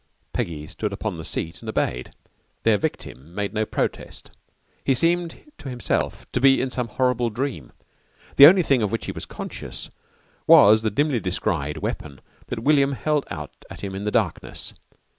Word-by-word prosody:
Peggy 75 Hz, -3 st, -3 dB
stood 105 Hz, +6 st, -4 dB
upon 100 Hz, -2 st, -4 dB
the -, -, -6 dB
seat 85 Hz, +2 st, -3 dB
and 115 Hz, -, -7 dB
obeyed. 65 Hz, -11 st, -2 dB, 0.5 s
Their 110 Hz, -2 st, +4 dB
victim 85 Hz, -, -5 dB
made 105 Hz, 0 st, -2 dB
no 110 Hz, 0 st, -1 dB
protest. -, -, -4 dB, 0.5 s
He 135 Hz, -, +2 dB
seemed 170 Hz, -, -1 dB
to 135 Hz, -, -7 dB
himself 125 Hz, -1 st, -2 dB
to 125 Hz, -, -1 dB
be 135 Hz, 0 st, +6 dB
in 130 Hz, -, -1 dB
some 125 Hz, -2 st, -2 dB
horrible 125 Hz, 0 st, +1 dB
dream. 115 Hz, -, -4 dB, 0.7 s
The 140 Hz, -, +12 dB
only 180 Hz, +2 st, +6 dB
thing 135 Hz, -6 st, +2 dB
of 105 Hz, -2 st, 0 dB
which 115 Hz, -, -2 dB
he -, -, -3 dB
was -, -, -7 dB
conscious -, -, -8 dB, 0.6 s
was 110 Hz, +2 st, +8 dB
the 110 Hz, -, 0 dB
dimly 140 Hz, +4 st, +1 dB
descried 85 Hz, -6 st, -2 dB
weapon 70 Hz, -3 st, -4 dB, 0.3 s
that 115 Hz, -2 st, -5 dB
William 140 Hz, -1 st, +4 dB
held 150 Hz, +1 st, -1 dB
out 75 Hz, -5 st, -6 dB, 0.2 s
at -, -, -10 dB
him 100 Hz, -1 st, -5 dB
in 95 Hz, +1 st, -5 dB
the 105 Hz, -, 0 dB
darkness. -, -, -2 dB
115 Hz, 175 wpm, -23 LUFS, 95-135 Hz, 0.7 s, The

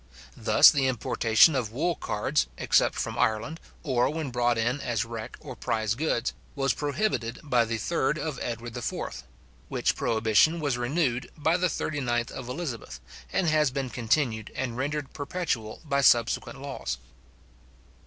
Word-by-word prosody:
Thus -, -, +7 dB
the 135 Hz, -2 st, +1 dB
importation 115 Hz, +3 st, +4 dB
of 125 Hz, -6 st, -1 dB
wool 165 Hz, +9 st, 0 dB
cards, 135 Hz, +1 st, -1 dB
except -, -, +3 dB
from -, -, -3 dB
Ireland, 110 Hz, +9 st, 0 dB, 0.2 s
or 125 Hz, -3 st, +2 dB
when 155 Hz, -3 st, -3 dB
brought 120 Hz, -1 st, +1 dB
in 120 Hz, +5 st, 0 dB
as 115 Hz, -3 st, -1 dB
wreck 115 Hz, 0 st, -7 dB
or 135 Hz, -5 st, -9 dB
prize 110 Hz, -2 st, -1 dB
goods, 125 Hz, -2 st, -1 dB, 0.2 s
was 135 Hz, -1 st, +1 dB
prohibited 145 Hz, -, -1 dB
by 125 Hz, -5 st, +2 dB
the 115 Hz, 0 st, -2 dB
3rd 145 Hz, +4 st, 0 dB
of 155 Hz, -4 st, -4 dB
Edward 120 Hz, 0 st, -4 dB
IV.; 70 Hz, -, -4 dB, 0.5 s
which -, -, 0 dB
prohibition 115 Hz, +9 st, +3 dB
was 145 Hz, -5 st, 0 dB
renewed 125 Hz, 0 st, 0 dB
by 160 Hz, +2 st, +2 dB
the 180 Hz, 0 st, +2 dB
39th 125 Hz, -8 st, -1 dB
of 125 Hz, -2 st, -7 dB
Elizabeth, 125 Hz, -, -5 dB, 0.3 s
and 185 Hz, -, +1 dB
has 155 Hz, -3 st, +3 dB
been 130 Hz, -1 st, -3 dB
continued 115 Hz, -2 st, 0 dB
and 125 Hz, -3 st, -3 dB
rendered 140 Hz, +2 st, -3 dB
perpetual 140 Hz, -8 st, -3 dB
by 140 Hz, -2 st, +1 dB
subsequent 120 Hz, -3 st, +3 dB
laws. -, -, -4 dB
125 Hz, 150 wpm, -27 LUFS, 115-150 Hz, 0.5 s, Thus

